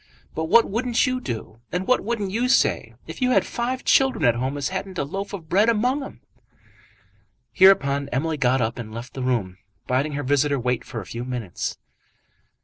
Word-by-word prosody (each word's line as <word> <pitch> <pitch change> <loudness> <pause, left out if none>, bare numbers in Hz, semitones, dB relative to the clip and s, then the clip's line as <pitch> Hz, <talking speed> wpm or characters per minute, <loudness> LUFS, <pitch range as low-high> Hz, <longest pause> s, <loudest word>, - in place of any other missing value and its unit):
But 160 - -2
what 230 +8 +5
wouldn't 235 +4 +1
you 255 -1 -1
do, 115 - -6
and 180 +1 -2
what 255 - +2
wouldn't 210 -3 -2
you 240 +5 0
say, - - +2
if - - -9
you 250 - +3
had 255 - +3
five 250 +2 -3
children 265 - +3
at 120 - +5
home 130 +4 -2
as 140 - -2
hadn't 190 0 -5
a - - 0
loaf 195 +8 -5
of 180 -6 -7
bread 205 +7 +3
among 250 +6 +1
'em?" 270 - -9 1.3
Hereupon 140 -8 +4
Emily 155 +5 -1
got 130 -1 +2
up 115 +2 -2
and 110 -2 -7
left 115 +3 -8
the 135 - -5
room, 110 -8 -1 0.3
bidding 135 +4 0
her 145 0 -3
visitor 145 +1 +2
wait 125 0 -1
for 115 - -6
a - - -10
few 115 +5 -6
minutes. 125 -7 -4
150 Hz, 195 wpm, -23 LUFS, -, 1.3 s, what